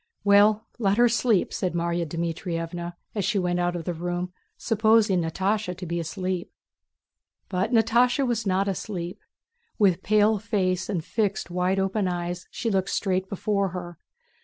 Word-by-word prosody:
"Well, 205 Hz, +2 st, +5 dB
let 200 Hz, -2 st, +2 dB
her 240 Hz, 0 st, +6 dB
sleep," 230 Hz, -3 st, +2 dB
said 185 Hz, -2 st, -1 dB
Márya 170 Hz, 0 st, -1 dB
Dmítrievna 170 Hz, +1 st, -4 dB, 0.2 s
as 205 Hz, -, -1 dB
she 205 Hz, +3 st, +1 dB
went 180 Hz, -1 st, 0 dB
out 175 Hz, 0 st, 0 dB
of 170 Hz, -2 st, -5 dB
the 175 Hz, -, -1 dB
room 175 Hz, +2 st, -3 dB, 0.2 s
supposing 220 Hz, -4 st, +3 dB
Natásha 190 Hz, +3 st, -1 dB
to -, -, -6 dB
be 170 Hz, 0 st, -2 dB
asleep. 185 Hz, +2 st, -3 dB, 1.0 s
But 190 Hz, +4 st, -1 dB
Natásha 245 Hz, +4 st, +3 dB
was 230 Hz, -3 st, -1 dB
not 190 Hz, +1 st, +1 dB
asleep; 185 Hz, -2 st, -4 dB, 0.6 s
with 190 Hz, -4 st, +3 dB
pale 215 Hz, +1 st, +3 dB
face 190 Hz, -3 st, -1 dB
and 175 Hz, -6 st, -2 dB
fixed 205 Hz, -5 st, -1 dB
wide 180 Hz, +2 st, +1 dB
open 195 Hz, +1 st, 0 dB
eyes 175 Hz, 0 st, -3 dB
she 230 Hz, -, -2 dB
looked 190 Hz, -1 st, +1 dB
straight 190 Hz, -1 st, -1 dB
before 200 Hz, 0 st, 0 dB
her. 175 Hz, -2 st, -8 dB
190 Hz, 155 wpm, -25 LUFS, 175-210 Hz, 1.0 s, her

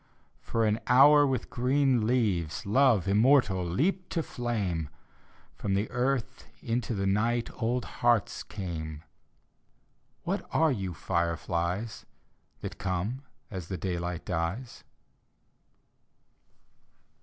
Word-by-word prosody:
For 115 Hz, -1 st, 0 dB
an 105 Hz, +1 st, +1 dB
hour 145 Hz, +3 st, +7 dB
with 130 Hz, -3 st, -2 dB
green 125 Hz, -2 st, +2 dB
leaves, 95 Hz, -10 st, 0 dB
Love 115 Hz, -2 st, +3 dB
immortal 105 Hz, -2 st, +4 dB
leaped 160 Hz, -, 0 dB
to 165 Hz, -, 0 dB
flame, 100 Hz, -, -2 dB, 0.6 s
From 100 Hz, -1 st, -2 dB
the 100 Hz, +3 st, -1 dB
earth 125 Hz, 0 st, -1 dB
into 115 Hz, 0 st, -2 dB
the 100 Hz, -1 st, -1 dB
night 115 Hz, +4 st, +1 dB
Old 120 Hz, +2 st, 0 dB
hearts -, -, +1 dB
came. 80 Hz, -6 st, -6 dB, 1.2 s
What -, -, -2 dB
are 160 Hz, -1 st, +3 dB
you, 95 Hz, -8 st, -3 dB
fireflies, 85 Hz, +5 st, -2 dB, 0.5 s
That -, -, -6 dB
come 100 Hz, +7 st, -2 dB, 0.3 s
as 95 Hz, -5 st, -6 dB
daylight 90 Hz, -1 st, -3 dB
dies? 90 Hz, +9 st, -3 dB
105 Hz, 100 wpm, -29 LUFS, 90-125 Hz, 1.2 s, hour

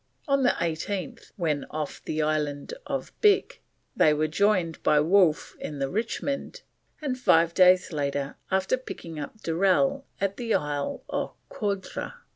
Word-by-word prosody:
On 275 Hz, -1 st, +3 dB
the 250 Hz, -, +5 dB
18th, 185 Hz, +8 st, -3 dB
when 155 Hz, -7 st, -1 dB
off 155 Hz, -1 st, -5 dB
the 155 Hz, 0 st, -1 dB
Island 150 Hz, -2 st, -1 dB
of -, -, -3 dB
Bic, 425 Hz, +4 st, +3 dB, 0.3 s
they 150 Hz, -1 st, +5 dB
were 155 Hz, +1 st, +1 dB
joined 180 Hz, -1 st, +1 dB
by 150 Hz, -, +4 dB
Wolfe 170 Hz, 0 st, +3 dB
in 150 Hz, -, -5 dB
the 135 Hz, -1 st, -2 dB
Richmond, 275 Hz, -, -3 dB, 0.4 s
and 260 Hz, -3 st, -2 dB
five 165 Hz, -7 st, +4 dB
days 185 Hz, -1 st, +5 dB, 0.6 s
after 190 Hz, +6 st, +1 dB
picked 165 Hz, -10 st, -8 dB
up 150 Hz, +9 st, -7 dB
Durell 195 Hz, +12 st, +2 dB
at 195 Hz, 0 st, -1 dB
the 235 Hz, -3 st, 0 dB
Ile 145 Hz, -1 st, -2 dB
aux -, -, -3 dB, 0.2 s
Coudres. 200 Hz, -, -3 dB
185 Hz, 140 wpm, -27 LUFS, 155-225 Hz, 0.6 s, the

